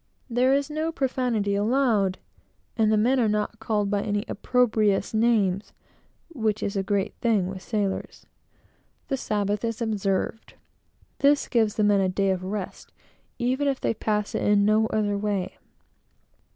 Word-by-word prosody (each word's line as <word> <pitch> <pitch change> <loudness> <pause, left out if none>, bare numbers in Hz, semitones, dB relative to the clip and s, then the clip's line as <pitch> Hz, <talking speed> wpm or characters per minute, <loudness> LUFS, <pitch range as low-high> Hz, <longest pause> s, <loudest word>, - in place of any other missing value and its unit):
There 250 +3 +3
is 280 +1 -1
no 310 +2 -1
profanity 250 -8 -1
allowed; 210 -3 +1 0.6
and 220 -1 +2
the 215 - +3
men 250 +5 +3
are 225 -3 +2
not 210 +1 -2
called 210 -2 -1
by 205 -1 +1
any 205 -1 -2
opprobrious 215 -4 +1
names, 215 -4 +1 0.6
which 220 -9 -1
is 200 - -2
a 195 - +1
great 200 +1 -1
thing 220 -6 +2
with 190 0 -6
sailors. 200 -2 -3 0.8
The 270 - 0
Sabbath 205 -3 -1
is 230 -1 -2
observed. 215 -1 -2 0.6
This 285 0 +3
gives 220 -4 +1
the 215 - +1
men 205 -1 +4
a 190 - +1
day 195 +1 +1
of 185 -1 -2
rest, 195 0 -6 0.5
even 260 +4 0
if 275 -2 0
they - - 0
pass 210 -1 -2
it - - -1
in 205 -1 +3
no 215 +1 +3
other 205 -2 0
way. 200 -3 -2
215 Hz, 155 wpm, -25 LUFS, 200-235 Hz, 0.8 s, men